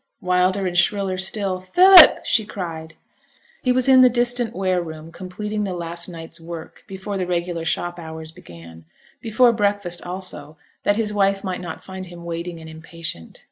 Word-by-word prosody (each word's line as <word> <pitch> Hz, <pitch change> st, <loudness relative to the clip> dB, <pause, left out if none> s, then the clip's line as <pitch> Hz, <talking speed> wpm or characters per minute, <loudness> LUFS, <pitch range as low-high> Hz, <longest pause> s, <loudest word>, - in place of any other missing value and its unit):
Wilder 185 Hz, +2 st, +1 dB
and 180 Hz, -1 st, -3 dB
shriller 185 Hz, +1 st, +1 dB
still, 190 Hz, -1 st, -1 dB
'Philip!' 360 Hz, -, +7 dB
she 220 Hz, -, +2 dB
cried. 165 Hz, -6 st, -7 dB, 0.7 s
He 250 Hz, -, +1 dB
was 255 Hz, 0 st, +1 dB
in 260 Hz, -1 st, +7 dB
the 255 Hz, -, +7 dB
distant 240 Hz, -1 st, 0 dB
ware 185 Hz, -2 st, 0 dB
room 160 Hz, -1 st, -9 dB
completing 210 Hz, +4 st, -5 dB
the 190 Hz, -3 st, -3 dB
last 170 Hz, 0 st, -4 dB
night's 165 Hz, 0 st, -9 dB
work 165 Hz, -1 st, -10 dB
before 195 Hz, +1 st, -6 dB
the 180 Hz, -, -2 dB
regular 170 Hz, -1 st, -3 dB
shop 175 Hz, +1 st, -2 dB
hours 160 Hz, -1 st, -8 dB
began; 85 Hz, -, -14 dB, 0.4 s
before 235 Hz, +2 st, +3 dB
breakfast, 200 Hz, -5 st, 0 dB
also, 175 Hz, -5 st, -5 dB, 0.2 s
that 205 Hz, -, +1 dB
his 215 Hz, -2 st, -1 dB
wife 195 Hz, -1 st, +1 dB
might 185 Hz, -2 st, -4 dB
not 170 Hz, -3 st, -8 dB
find 190 Hz, -1 st, -8 dB
him 170 Hz, -1 st, -12 dB
waiting 170 Hz, 0 st, -5 dB
and 160 Hz, -, -11 dB
impatient. 160 Hz, -, -9 dB
180 Hz, 170 wpm, -21 LUFS, 165-205 Hz, 0.7 s, Philip